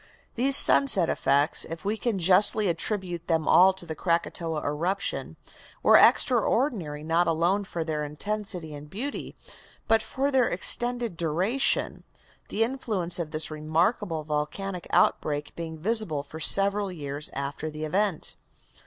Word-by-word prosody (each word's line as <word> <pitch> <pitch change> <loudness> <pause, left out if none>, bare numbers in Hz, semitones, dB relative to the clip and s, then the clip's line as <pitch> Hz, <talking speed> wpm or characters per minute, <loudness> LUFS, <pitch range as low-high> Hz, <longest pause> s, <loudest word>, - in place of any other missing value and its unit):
These 270 +3 +7
sunset 200 -12 +6
effects, 140 +3 +1
if 165 +3 -9
we 210 +2 -1
can 225 -2 -2
justly 195 +4 +4
attribute 175 0 -3
them 160 -2 -1
all 185 +2 +6
to 185 -2 -10
the 160 - -6
Krakatoa 165 -1 -2
eruption, 170 +7 -3 0.5
were - - +5
extraordinary 225 - +2
not 165 +2 +1
alone 170 +5 0
for 170 -3 -4
their 155 -2 -3
intensity 180 +1 -5
and 145 0 -11
beauty 255 - -6 0.5
but 225 0 +3
for 275 +5 -3
their 260 -3 +2
extended 240 -4 0
duration, 180 - -1 0.5
the 220 - 0
influence 220 -9 -3
of 165 -3 -4
this 155 0 0
remarkable 160 +3 -1
volcanic 155 +5 -4
outbreak 145 -1 0
being 165 -1 -7
visible 180 -5 -1
for 155 +2 -11
several 200 +4 +1
years 145 -3 -5
after 140 +3 -5
the 155 0 -6
event. 185 +1 -2
175 Hz, 135 wpm, -26 LUFS, 155-210 Hz, 0.5 s, These